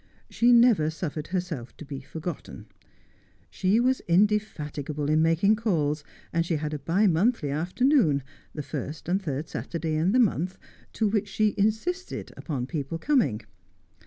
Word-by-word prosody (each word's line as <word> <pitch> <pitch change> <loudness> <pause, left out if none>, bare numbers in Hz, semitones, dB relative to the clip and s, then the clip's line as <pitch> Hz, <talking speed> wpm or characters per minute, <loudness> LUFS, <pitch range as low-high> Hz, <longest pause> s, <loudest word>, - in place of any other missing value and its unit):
She 240 +1 +4
never 235 -10 +5
suffered 155 -2 -4
herself 175 -9 -4
to 155 - -9
be 140 -2 -6
forgotten. 160 +3 -7 0.9
She 190 +4 +2
was 255 +2 +2
indefatigable 155 -7 0
in 155 +1 +4
making 165 +7 +3
calls, 155 -9 0 0.3
and 165 0 +2
she 170 -1 -1
had 150 0 -3
a 150 - -3
bi 170 +9 +2
monthly 180 - +2
afternoon, 175 - +2 0.3
the 150 - -5
first 145 +2 -6
and 190 +3 +1
third 150 -3 -3
Saturday 165 -1 -4
in 160 +5 +2
the 255 - +3
month, 185 - +1 0.4
to 220 - +1
which 205 0 0
she 210 +1 +1
insisted 220 - -1
upon 135 -7 -4
people 145 +2 -4
coming. 205 - +1
170 Hz, 150 wpm, -27 LUFS, 150-210 Hz, 0.9 s, never